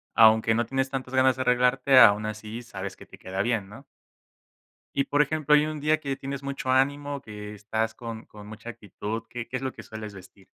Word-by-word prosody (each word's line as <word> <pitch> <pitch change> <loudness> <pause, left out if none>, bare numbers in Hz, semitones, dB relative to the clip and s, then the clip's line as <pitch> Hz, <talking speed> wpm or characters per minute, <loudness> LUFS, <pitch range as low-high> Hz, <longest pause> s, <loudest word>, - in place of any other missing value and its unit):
aunque 110 0 +6
no 120 0 +1
tienes 135 +2 -1
tantas 130 -1 -5
ganas 130 -1 +4
de 130 - -2
arreglarte, 125 +2 +4
aún 105 -1 +7
así 110 +2 -6
sabes 95 -4 -7
que - - -13
te - - -15
queda 95 +1 -3
bien, 110 -5 -1
¿no? 115 +7 -12 1.1
Y 140 0 +2
por 145 +1 +3
ejemplo, 150 0 +2
hay 150 +1 +4
un 155 -1 -4
día 155 +2 +2
que 140 -2 -3
tienes 140 0 -6
mucho 140 -1 -4
ánimo, 140 +2 +1
que 105 -2 -8
estás 110 +2 -2
con 115 -1 -7
con 105 -1 -13
mucha 110 +2 -9
actitud, 110 -1 -6
¿qué 120 -1 -6
qué 125 - -6
es 130 - -7
lo 130 - -2
que - - -10
sueles 110 -1 -8
vestir? 95 0 -15
120 Hz, 215 wpm, -26 LUFS, 110-135 Hz, 1.1 s, aún